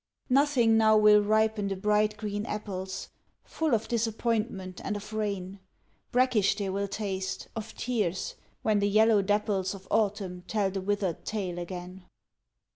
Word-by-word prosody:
Nothing 255 Hz, -5 st, +4 dB
now 220 Hz, -1 st, +5 dB
will 210 Hz, 0 st, +7 dB
ripen 215 Hz, 0 st, +2 dB
the 195 Hz, -, -2 dB
bright 210 Hz, +2 st, +1 dB
green 205 Hz, -1 st, -3 dB
apples, 190 Hz, -3 st, -5 dB, 0.3 s
Full 315 Hz, -6 st, 0 dB
of 220 Hz, 0 st, -2 dB
disappointment 220 Hz, -4 st, -1 dB
and 210 Hz, -, -2 dB
of 210 Hz, +1 st, -7 dB
rain, 200 Hz, -3 st, -3 dB, 0.5 s
Brackish 240 Hz, -6 st, +3 dB
they 200 Hz, -2 st, -2 dB
will 200 Hz, +1 st, -1 dB
taste, 195 Hz, -2 st, -4 dB
of 225 Hz, -1 st, -6 dB
tears, 210 Hz, -8 st, -1 dB, 0.3 s
when 215 Hz, -2 st, +3 dB
the 200 Hz, 0 st, +2 dB
yellow 215 Hz, 0 st, +5 dB
dapples 205 Hz, -1 st, 0 dB
Of 190 Hz, -1 st, -13 dB
autumn 200 Hz, -4 st, 0 dB
tell 205 Hz, -3 st, 0 dB
the 195 Hz, 0 st, -3 dB
withered 195 Hz, -3 st, -1 dB
tale 185 Hz, -5 st, -3 dB
again. 180 Hz, +1 st, -7 dB
205 Hz, 145 wpm, -28 LUFS, 190-220 Hz, 0.5 s, will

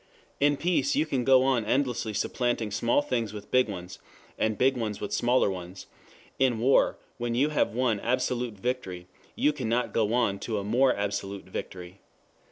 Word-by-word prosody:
In 145 Hz, 0 st, +3 dB
peace 160 Hz, -5 st, +1 dB
you 155 Hz, -, +2 dB
can 135 Hz, -5 st, -1 dB
go 130 Hz, 0 st, +5 dB
on 130 Hz, -4 st, +2 dB
endlessly 120 Hz, -2 st, -1 dB
supplanting 120 Hz, -3 st, -1 dB
small 120 Hz, +7 st, +1 dB
things 120 Hz, -6 st, -2 dB
with 105 Hz, -1 st, -9 dB
big 125 Hz, -3 st, +3 dB
ones, 90 Hz, -2 st, -7 dB, 0.4 s
and 110 Hz, -1 st, 0 dB
big 130 Hz, +1 st, +3 dB
ones 110 Hz, -4 st, -3 dB
with 105 Hz, -, -3 dB
bigger 120 Hz, 0 st, +3 dB
ones; 90 Hz, 0 st, -8 dB, 0.5 s
in 130 Hz, -3 st, +3 dB
war 125 Hz, +5 st, +3 dB, 0.2 s
when 120 Hz, 0 st, -2 dB
you 140 Hz, +5 st, +2 dB
have 145 Hz, -7 st, 0 dB
won 120 Hz, -4 st, +1 dB
absolute 125 Hz, 0 st, -1 dB
victory, 95 Hz, -5 st, -4 dB, 0.3 s
you 150 Hz, -, +2 dB
cannot 125 Hz, -3 st, -1 dB
go 110 Hz, -2 st, +1 dB
on 110 Hz, -6 st, +1 dB
to 110 Hz, 0 st, -3 dB
a 100 Hz, -, -2 dB
more 125 Hz, +6 st, +3 dB
absolute 100 Hz, -1 st, -3 dB
victory. 90 Hz, 0 st, -7 dB
120 Hz, 175 wpm, -27 LUFS, 105-130 Hz, 0.5 s, go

